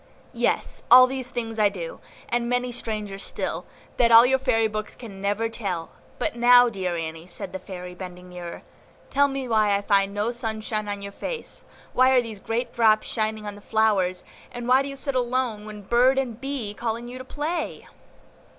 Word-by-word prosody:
"Yes, - - -1
all 255 +1 +10
these 255 -1 -4
things 225 -2 -4
I 210 -1 +5
do, 175 -5 -7 0.3
and 240 0 0
many 245 0 0
stranger 215 -4 -4
still, - - -4 0.3
that 235 -1 +4
all 230 +1 +10
your 265 +1 +3
fairy 230 -4 +2
books 215 0 -5
can 200 -6 -10
never 205 +3 0
tell; 195 -7 -4 0.3
but - - -2
now, 245 +1 +7
dear 185 -5 -2
Annie," 160 +1 -5
said 185 +1 -5
the 190 - -4
Fairy, 180 -1 -8
bending 180 0 -9
nearer, 175 -1 -8 0.5
"tell 285 +1 +4
me 270 -2 -4
why 215 -3 +3
I 200 - 0
found 200 -1 +3
no 210 +3 0
sunshine 220 -3 -3
on 205 -1 -4
your 200 - -6
face; 470 - -5 0.3
why 255 +1 +5
are 260 -1 +5
these 220 -3 -7
great 230 +4 -3
drops 220 -2 +4
shining 215 -1 -2
on 205 - -4
the 205 - -13
flowers, 200 -5 +1 0.3
and 240 0 -6
why 255 +2 +5
do 275 - -4
you 275 - -6
sit 275 0 -1
alone 245 -4 -1
when 210 -1 -9
BIRD 245 +5 +4
and 250 -3 -2
BEE 270 -6 -3
are - - -10
calling 230 +2 -3
you 250 +1 -8
to - - -6
play?" 310 +5 -4
225 Hz, 195 wpm, -25 LUFS, 200-245 Hz, 0.5 s, all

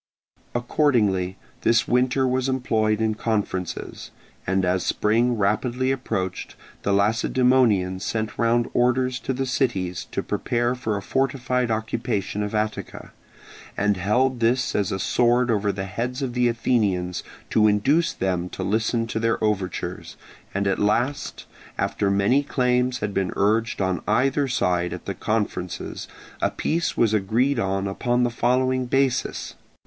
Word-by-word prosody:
Accordingly 110 -8 +1 0.2
this 115 0 +3
winter 130 +2 +2
was 130 +1 0
employed 110 -5 +1
in 110 -1 +1
conferences; 100 -6 -3 0.4
and 95 0 +1
as 90 0 +1
spring 115 +3 +1
rapidly 120 +6 +1
approached, 100 -9 -3 0.3
the 100 - 0
Lacedaemonians 105 -2 +2
sent 110 -1 -2
round 115 0 +2
orders 125 +1 +2
to - - -3
the 135 +1 -1
cities 100 -9 -1
to - - -2
prepare 120 0 0
for 110 -5 -2
a 100 - -6
fortified 130 -1 0
occupation 110 -2 -2
of 105 +1 -3
Attica, 110 0 -3 0.7
and 105 0 +2
held 120 +7 +1
this 120 +2 +1
as 100 -3 0
a - - -1
sword 120 +4 +2
over 105 -2 +1
the 95 0 -4
heads 120 +7 -3
of 125 -2 -3
the 125 0 +2
Athenians 105 -7 0 0.3
to 110 -1 +4
induce 140 +12 +2
them 90 -2 -2
to 95 - -5
listen 110 +4 0
to 110 -1 -3
their 115 0 +1
overtures; 100 -4 -2 0.3
and 100 +1 -1
at 100 - +1
last, 120 +8 0 0.3
after 100 - 0
many 100 +8 +3
claims 125 -2 0
had 105 -1 -2
been 95 -2 0
urged 110 +3 +1
on 95 -2 0
either 135 +6 +2
side 90 -8 0
at - - -8
the - - -3
conferences 105 -5 -3 0.3
a - - +2
peace 170 +2 -1
was 110 -2 +3
agreed 115 +6 +1
on 95 -1 -1
upon 120 +5 0
the 120 - +1
following 130 +2 +1
basis. 135 0 0
115 Hz, 145 wpm, -24 LUFS, 100-125 Hz, 0.7 s, to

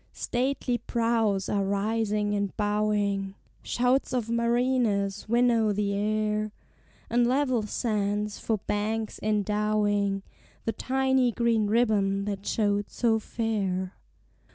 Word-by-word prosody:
Stately 250 -1 -1
prows 225 -4 0
are 200 -1 0
rising 210 +1 0
and 200 -2 -2
bowing 205 -2 0 0.3
(Shouts 250 +2 +1
of 235 -3 -1
mariners 235 -4 +1
winnow 235 -2 +3
the 200 0 0
air) 215 +1 0 0.6
And 240 +1 +2
level 255 -2 +2
sands 210 -1 -1
for 220 - 0
banks 215 +1 -2
endowing 210 -1 +1 0.4
The 225 - +1
tiny 265 -1 +1
green 230 -2 +1
ribbon 205 -3 +2
that 200 -1 -4
showed 205 -2 0
so 225 -2 +1
fair. 200 -5 -2
215 Hz, 105 wpm, -27 LUFS, 205-235 Hz, 0.6 s, winnow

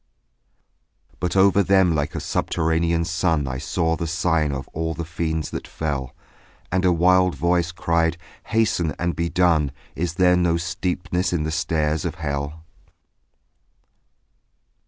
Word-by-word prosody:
But 90 0 -2
over 100 +1 +5
them 95 -2 +4
like 75 -2 -1
a - - -1
subterranean 85 0 0
sun 85 -4 0
I 65 0 -3
saw 80 +3 0
the 85 - -3
sign 80 -2 +1
of 70 0 -5
all 80 0 -3
the 85 - -4
fiends 80 -2 -3
that - - -5
fell; 70 -5 -4 0.6
And 95 +1 +1
a 90 - +4
wild 90 +1 +3
voice 85 0 +1
cried 85 -1 0 0.3
"Hasten 105 -9 +1
and 85 -2 -1
be 85 +2 -1
done, 85 -5 +2 0.2
Is 85 0 -2
there 90 -1 +4
no 85 -1 +2
steepness 90 +1 -2
in 80 -3 0
the 80 - -2
stairs 80 -1 0
of - - -3
hell?" 70 +1 -4
85 Hz, 140 wpm, -23 LUFS, 80-90 Hz, 0.6 s, over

